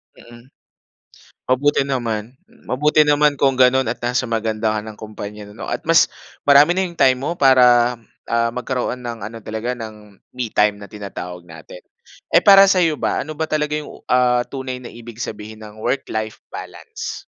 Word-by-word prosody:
Mm. 120 Hz, +1 st, -16 dB, 1.0 s
Mabuti 140 Hz, +4 st, +2 dB
naman, 120 Hz, -3 st, -3 dB, 0.3 s
mabuti 150 Hz, +4 st, +3 dB
naman 150 Hz, 0 st, +4 dB
kung 135 Hz, -1 st, +3 dB
gano'n 130 Hz, -1 st, +4 dB
at 115 Hz, -, -2 dB
nasa 125 Hz, +1 st, 0 dB
maganda 110 Hz, -1 st, -1 dB
ka -, -, -1 dB
ng 110 Hz, -1 st, -10 dB
kompanya 105 Hz, -1 st, -8 dB
'no 105 Hz, -, -9 dB
at -, -, -1 dB
mas 165 Hz, 0 st, +6 dB, 0.4 s
marami 145 Hz, +4 st, +6 dB
na 190 Hz, -, +1 dB
'yong 170 Hz, -2 st, -9 dB
time 130 Hz, -1 st, +5 dB
mo 160 Hz, -, -1 dB
para, 125 Hz, -2 st, +5 dB, 0.3 s
ah, 115 Hz, 0 st, +1 dB
magkaroon 125 Hz, 0 st, -3 dB
ng 120 Hz, -2 st, -6 dB
ano 115 Hz, +2 st, -8 dB
talaga 110 Hz, +3 st, -4 dB
ng, 105 Hz, -4 st, -11 dB, 0.2 s
me 125 Hz, -3 st, -4 dB
time 105 Hz, 0 st, +3 dB
na 100 Hz, -, -10 dB
tinatawag 90 Hz, -4 st, -8 dB
natin. 80 Hz, +2 st, -12 dB, 0.6 s
Eh -, -, +6 dB
para 195 Hz, -1 st, +8 dB
sa'yo 175 Hz, -6 st, +2 dB
ba, -, -, -1 dB
ano 155 Hz, -, -7 dB
ba 160 Hz, +1 st, -3 dB
talaga 150 Hz, -1 st, -1 dB
'yong 150 Hz, -, -9 dB, 0.2 s
ah 125 Hz, -1 st, +3 dB
tunay 130 Hz, -2 st, -6 dB
na 120 Hz, -, -9 dB
ibig 115 Hz, -1 st, -11 dB
sabihin 110 Hz, +1 st, -8 dB
ng 105 Hz, 0 st, -13 dB
work-life 110 Hz, -4 st, -3 dB
balance? -, -, -8 dB
120 Hz, 170 wpm, -20 LUFS, 110-135 Hz, 1.0 s, para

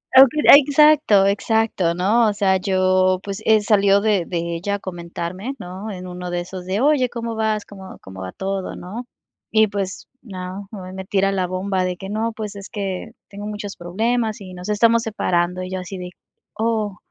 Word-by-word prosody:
o 265 Hz, -, +11 dB
que 305 Hz, -, -3 dB, 0.2 s
exacto, 290 Hz, -7 st, +5 dB
exacto, 200 Hz, -3 st, +1 dB
¿no?, 215 Hz, +6 st, +3 dB
o -, -, -1 dB
sea, 195 Hz, -2 st, +2 dB
yo, 185 Hz, 0 st, +2 dB
pues, 200 Hz, +1 st, -5 dB
eh, 220 Hz, -1 st, +5 dB
salió 200 Hz, -1 st, +4 dB
de 205 Hz, -5 st, +1 dB
de 170 Hz, -1 st, -3 dB
ella 200 Hz, +4 st, -2 dB
a 200 Hz, -, -5 dB
comentarme, 175 Hz, +6 st, -6 dB
¿no?, 190 Hz, +4 st, -7 dB
en 185 Hz, -2 st, -7 dB
uno 180 Hz, 0 st, -6 dB
de 175 Hz, 0 st, -2 dB
esos 180 Hz, 0 st, -8 dB
de: 195 Hz, +5 st, -1 dB
"Oye, 280 Hz, -4 st, +3 dB
¿cómo 230 Hz, -1 st, -5 dB
vas? 220 Hz, -1 st, -1 dB
¿Cómo 190 Hz, -2 st, -11 dB
cómo 95 Hz, 0 st, -10 dB
va 95 Hz, 0 st, -5 dB
todo", 195 Hz, 0 st, -4 dB
¿no?, 215 Hz, +8 st, -7 dB, 0.5 s
y 220 Hz, 0 st, +5 dB
pues, 200 Hz, -1 st, -4 dB
no, 190 Hz, -2 st, -7 dB
nada 190 Hz, -4 st, -8 dB
más 185 Hz, -, -9 dB
me 190 Hz, 0 st, -7 dB
tira 195 Hz, 0 st, +1 dB
la 185 Hz, -2 st, 0 dB
bomba 185 Hz, +1 st, -1 dB
de 180 Hz, -1 st, -3 dB
que 195 Hz, +2 st, -8 dB
no, 225 Hz, +2 st, -1 dB
pues, 215 Hz, -2 st, -6 dB
es 200 Hz, 0 st, -9 dB
que 195 Hz, -4 st, -4 dB, 0.2 s
tengo 205 Hz, +1 st, -7 dB
muchos 205 Hz, -1 st, -6 dB
problemas 220 Hz, +5 st, -1 dB
y 185 Hz, -2 st, -9 dB
nos 180 Hz, +2 st, -8 dB
estamos 230 Hz, +2 st, +4 dB
separando, 180 Hz, -4 st, -1 dB
y 185 Hz, -, -7 dB
yo 185 Hz, -, -2 dB
así 185 Hz, +1 st, -7 dB
de: 180 Hz, 0 st, -6 dB, 0.4 s
"Oh, 215 Hz, -3 st, -1 dB
195 Hz, 200 wpm, -21 LUFS, 185-215 Hz, 0.5 s, o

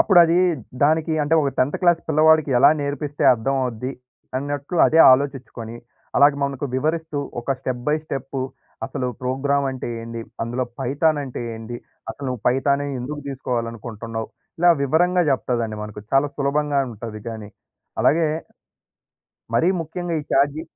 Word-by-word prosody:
అప్పుడది 175 Hz, -3 st, +6 dB, 0.5 s
దానికి 160 Hz, +2 st, +3 dB
అంటే 155 Hz, +3 st, +2 dB
ఒక 140 Hz, -, +1 dB
10థ్ 130 Hz, +3 st, +2 dB
క్లాస్ 175 Hz, -2 st, +4 dB
పిల్లవాడికి 155 Hz, -1 st, +4 dB
ఎలా 140 Hz, -, +7 dB
నేర్పిస్తే 145 Hz, 0 st, -3 dB
అర్థం 130 Hz, +4 st, -1 dB
అవుది 125 Hz, +1 st, -3 dB, 0.5 s
అన్నట్టు 145 Hz, +4 st, -4 dB
అదే 160 Hz, -, +3 dB
ఆలోచిచ్చుకొని 130 Hz, -4 st, -2 dB, 0.4 s
అలాగ 145 Hz, +1 st, +7 dB
మనకు 140 Hz, 0 st, -3 dB
వివరిస్తూ, 155 Hz, +2 st, -1 dB, 0.2 s
ఒక 120 Hz, -, -17 dB
స్టెప్ 125 Hz, -1 st, -4 dB
బై 150 Hz, -, +3 dB
స్టెప్ 135 Hz, -2 st, -5 dB, 0.5 s
అసలు 125 Hz, -, -3 dB
ప్రోగ్రామ్ 140 Hz, +2 st, 0 dB
అంటే 130 Hz, -2 st, -5 dB
ఏంది? 115 Hz, 0 st, -6 dB, 0.2 s
అందులో 120 Hz, +2 st, -2 dB, 0.2 s
పైథాన్ 145 Hz, +4 st, +1 dB
అంటే 130 Hz, -, -6 dB
ఏంది? 115 Hz, +2 st, -7 dB, 0.3 s
అసలు 140 Hz, +4 st, -7 dB
నువ్వు 125 Hz, -4 st, -4 dB
పైథానే 140 Hz, +2 st, +1 dB
ఎందుకు 145 Hz, +4 st, -5 dB
తీసుకోవాలనుకుంటున్నావు? 115 Hz, -3 st, -4 dB, 0.3 s
ఇలా 175 Hz, 0 st, +6 dB
వివరంగా 175 Hz, +6 st, +3 dB
చెప్తదండి 120 Hz, -4 st, -1 dB
మనకు. 105 Hz, 0 st, -7 dB
చాలా 135 Hz, +2 st, +4 dB
సులభంగా 145 Hz, 0 st, +1 dB
ఉంటది 110 Hz, 0 st, -7 dB
గానీ. 110 Hz, -3 st, -7 dB, 0.5 s
అలాగే 160 Hz, +2 st, +4 dB, 1.3 s
మరీ 165 Hz, +9 st, +3 dB
ముఖ్యంగా 170 Hz, +2 st, -4 dB
ఈ -, -, -11 dB
చాట్ 140 Hz, +1 st, +4 dB
జీ 160 Hz, -, -4 dB
140 Hz, 140 wpm, -22 LUFS, 120-150 Hz, 1.3 s, ఎలా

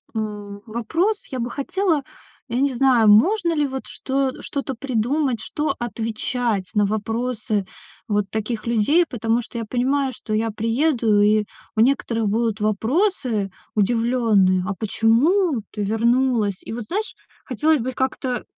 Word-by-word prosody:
м, 205 Hz, -2 st, -5 dB
вопрос. 325 Hz, -, -1 dB
Я 260 Hz, -, -3 dB
бы 240 Hz, 0 st, -2 dB
хотела, 320 Hz, +2 st, 0 dB, 0.5 s
я 240 Hz, +2 st, -1 dB
не 280 Hz, -2 st, +2 dB
знаю, 245 Hz, -3 st, +4 dB
можно 340 Hz, -, +4 dB
ли 295 Hz, -2 st, +1 dB
вот 265 Hz, -1 st, -5 dB
что 270 Hz, 0 st, -1 dB
что-то 275 Hz, -1 st, -3 dB
придумать, 255 Hz, +1 st, 0 dB
что 295 Hz, +5 st, -2 dB
отвечать 225 Hz, -3 st, -2 dB
на 205 Hz, -1 st, +4 dB
вопросы 220 Hz, 0 st, -2 dB, 0.4 s
вот 205 Hz, -3 st, 0 dB
таких 220 Hz, +1 st, -3 dB
людей, 235 Hz, +10 st, +3 dB
потому 230 Hz, -3 st, -1 dB
что 235 Hz, -, -9 dB
я 230 Hz, -, -3 dB
понимаю, 260 Hz, +4 st, 0 dB
что 215 Hz, -1 st, -6 dB
я 225 Hz, +1 st, +1 dB
приеду, 225 Hz, -1 st, +2 dB
и 210 Hz, 0 st, +3 dB, 0.3 s
у -, -, -2 dB
некоторых 230 Hz, -3 st, +1 dB
будут 225 Hz, 0 st, 0 dB
вопросы 225 Hz, -, 0 dB, 0.3 s
удивлённые: 215 Hz, -4 st, +2 dB
"А 205 Hz, -, -1 dB
почему 240 Hz, -, +2 dB
ты 210 Hz, -1 st, -3 dB
вернулась?" 225 Hz, -1 st, +1 dB
И -, -, -6 dB
вот, 235 Hz, -2 st, -5 dB
знаешь, 420 Hz, +5 st, -3 dB, 0.3 s
хотелось 300 Hz, +5 st, +2 dB
бы 250 Hz, +2 st, -2 dB
их 260 Hz, -, -7 dB
как-то 260 Hz, -2 st, -2 dB
235 Hz, 145 wpm, -22 LUFS, 215-270 Hz, 0.5 s, знаю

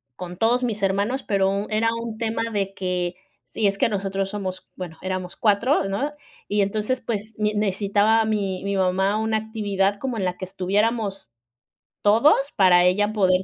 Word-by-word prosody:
con 180 Hz, +1 st, -7 dB
todos 240 Hz, +3 st, +2 dB
mis 215 Hz, -4 st, -2 dB
hermanos, 200 Hz, +7 st, 0 dB
pero 195 Hz, 0 st, 0 dB
era 220 Hz, +1 st, +2 dB
un 230 Hz, -1 st, -5 dB
tema 225 Hz, 0 st, -1 dB
de 195 Hz, -2 st, -1 dB
que 180 Hz, -2 st, -2 dB, 0.3 s
sí, 215 Hz, -, 0 dB
es 195 Hz, 0 st, 0 dB
que -, -, +2 dB
nosotros 195 Hz, -1 st, -2 dB
somos, 190 Hz, -2 st, -5 dB
bueno, 175 Hz, -3 st, -7 dB
éramos 185 Hz, -1 st, -4 dB
4 225 Hz, +6 st, +2 dB
¿no? 265 Hz, +10 st, -1 dB, 0.4 s
Y 205 Hz, 0 st, +1 dB
entonces, 215 Hz, +5 st, -1 dB
pues, 215 Hz, -1 st, -4 dB
mi 210 Hz, 0 st, 0 dB
necesitaba 205 Hz, +2 st, +2 dB
mi 200 Hz, -4 st, -1 dB
mi 200 Hz, 0 st, -1 dB
mamá 190 Hz, +2 st, +2 dB
una 220 Hz, 0 st, +1 dB
actividad 205 Hz, -2 st, -1 dB
como 255 Hz, -3 st, -3 dB
en 200 Hz, -, -1 dB
la 180 Hz, 0 st, -2 dB
que 185 Hz, -, -5 dB
estuviéramos 200 Hz, -, -1 dB, 0.7 s
todos 225 Hz, +9 st, +5 dB, 0.2 s
para 180 Hz, -3 st, +5 dB
ella 205 Hz, +4 st, +2 dB
poder 185 Hz, -3 st, +3 dB
200 Hz, 170 wpm, -23 LUFS, 190-220 Hz, 0.7 s, todos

